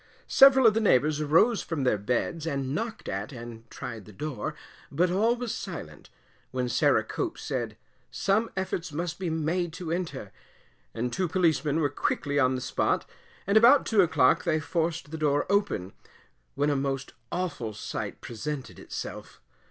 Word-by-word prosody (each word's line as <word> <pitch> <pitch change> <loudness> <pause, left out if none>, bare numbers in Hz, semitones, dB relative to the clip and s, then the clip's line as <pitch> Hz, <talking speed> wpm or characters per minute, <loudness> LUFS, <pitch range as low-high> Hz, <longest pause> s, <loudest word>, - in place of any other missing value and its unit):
Several 270 -1 +7
of 220 - +7
the 225 - +1
neighbours 155 - +3
arose 165 +10 +4
from 160 -5 -3
their 125 -5 +2
beds 125 +9 -1
and 135 -3 -2
knocked 225 +5 -4
at, 100 +5 -3
and 115 -2 -9
tried 120 -6 -7
the 105 - -12
door, 125 +1 -4 0.4
but 175 +5 +2
all 220 +6 +3
was 245 -2 -4
silent, - - -7 0.4
when 125 -1 -2
Sarah 120 - +3
Cope - - -3
said, - - -4 0.3
some 210 +4 +1
efforts 185 -3 -2
must 170 +3 -3
be 185 -3 -2
made 160 +2 -1
to 165 -1 -5
enter, 175 0 -3 0.6
and 120 +1 -2
two 185 -1 0
Policemen 160 -4 +1
were 145 - +3
quickly 145 0 -1
on 130 -1 +3
the 130 - -3
spot, - - 0 0.4
and 200 +2 +4
about 245 +5 +7
2 215 -3 +4
o'clock 155 -7 +3
they 160 -3 +1
forced 165 -1 -2
the 160 - -5
door 145 -1 +2
open, 200 - 0 0.6
when 145 +1 +2
a - - +1
most 135 0 -2 0.2
awful 170 -11 -3
sight 105 - -5
presented 140 +4 -6
itself. - - -7
155 Hz, 165 wpm, -27 LUFS, 130-185 Hz, 0.6 s, Several